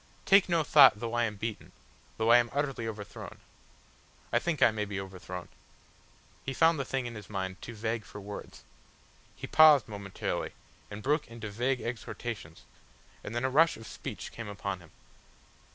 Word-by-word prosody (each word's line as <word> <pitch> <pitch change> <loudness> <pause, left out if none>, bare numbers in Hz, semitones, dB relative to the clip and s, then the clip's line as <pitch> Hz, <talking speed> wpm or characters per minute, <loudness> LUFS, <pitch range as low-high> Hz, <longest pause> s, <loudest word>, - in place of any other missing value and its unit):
Take 195 -1 +6
no 170 -2 +3
thought 140 -9 +7
though 115 0 -4
I 120 0 +2
am 105 -2 -3
beaten, 110 +2 -5 0.4
though 110 +1 +3
I 120 - +9
am 120 0 0
utterly 135 -5 -1
overthrown. 105 -3 -8 0.9
I - - +5
think 165 -5 -2
I - - +7
may 110 -1 -2
be 100 -2 -4
overthrown." 90 -2 -7 1.0
He 135 - -4
found 165 0 +4
the 135 - -1
thing 135 -1 -2
in 120 - -5
his 105 -2 -10
mind 95 -2 -4
too 115 - -8
vague 110 +1 -2
for 105 - -10
words. 100 +1 -9 0.7
He - - -7
paused 155 -6 +7
momentarily, 100 -3 -4 0.4
and 105 +1 -8
broke 150 +2 +1
into 115 -3 -7
vague 125 +4 0
exhortations, 115 -6 -6 0.6
and 115 - -6
then 120 +2 0
a - - +2
rush 160 +5 +4
of 115 - -11
speech - - -7
came 115 -2 -7
upon 100 -2 -4
him. 90 -2 -16
115 Hz, 175 wpm, -30 LUFS, 105-135 Hz, 1.0 s, I